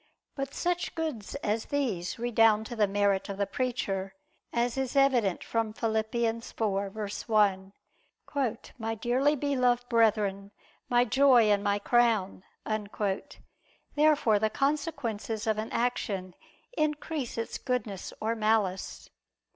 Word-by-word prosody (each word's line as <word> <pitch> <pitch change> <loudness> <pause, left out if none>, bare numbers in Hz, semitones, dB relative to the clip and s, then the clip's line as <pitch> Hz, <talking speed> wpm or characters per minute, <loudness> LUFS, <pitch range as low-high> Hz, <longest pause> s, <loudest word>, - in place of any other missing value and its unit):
But 275 0 -5
such 355 0 -1
goods 305 -11 -4
as 215 +2 0
these 220 -12 -2
redound 225 -2 +3
to 240 - -6
the 210 -2 +3
merit 200 0 +1
of 195 - -4
the 200 - +1
preacher, 195 -6 -2 0.4
as 235 0 0
is 265 0 -2
evident 250 -9 +3
from 225 -2 -1
Phil. 225 0 -1
4:1: 215 -3 0 1.1
"My 225 0 -2
dearly 255 +7 +2
beloved 250 -4 +1
brethren, 210 -4 +2 0.4
my 245 0 +4
joy 250 -3 +5
and 200 -1 +2
my 205 -1 +2
crown." 220 -5 +2 1.5
Therefore 295 -8 +4
the 220 +1 +1
consequences 250 -5 -2
of 220 -1 +1
an 220 - -4
action 200 -6 -1 0.4
increase 300 -4 -2
its 230 - -3
goodness 235 -7 -3
or 220 +1 0
malice. 215 -4 0
225 Hz, 115 wpm, -29 LUFS, 205-250 Hz, 1.5 s, joy